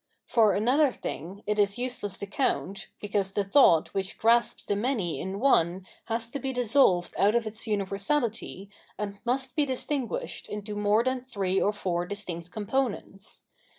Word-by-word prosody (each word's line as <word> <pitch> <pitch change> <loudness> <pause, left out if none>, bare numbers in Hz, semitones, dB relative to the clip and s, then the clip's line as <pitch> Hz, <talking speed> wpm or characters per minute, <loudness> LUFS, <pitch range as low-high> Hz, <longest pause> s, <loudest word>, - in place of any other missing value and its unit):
For 220 -3 +4
another 260 +7 +3
thing 190 - -6
it 210 0 0
is 200 +1 +2
use 250 0 -2
less 200 -2 -4
to - - -5
count, 200 -3 -1
because 200 -2 -1
the 205 - +1
thought 195 - +5
which 195 -1 -3
grasps 235 +1 +3
the 205 - 0
many 210 -6 -1
in 190 +1 -4
one 185 -8 +3 0.2
has 230 0 -1
to 280 - -4
be 270 -1 -2
dissolved 240 -7 +3
out 205 +3 +4
of 235 -1 +2
its 215 +2 -4
universality 200 0 -1 0.3
and 200 -1 -4
must 255 +1 -1
be 300 - +3
distinguished 265 -1 -3
into 210 0 -5
more 210 +2 +3
than 255 0 0
three 195 -6 0
or 205 - +3
four 175 -4 -2
distinct 180 -4 -5
components. 215 -1 -3
210 Hz, 165 wpm, -28 LUFS, 195-245 Hz, 0.3 s, thought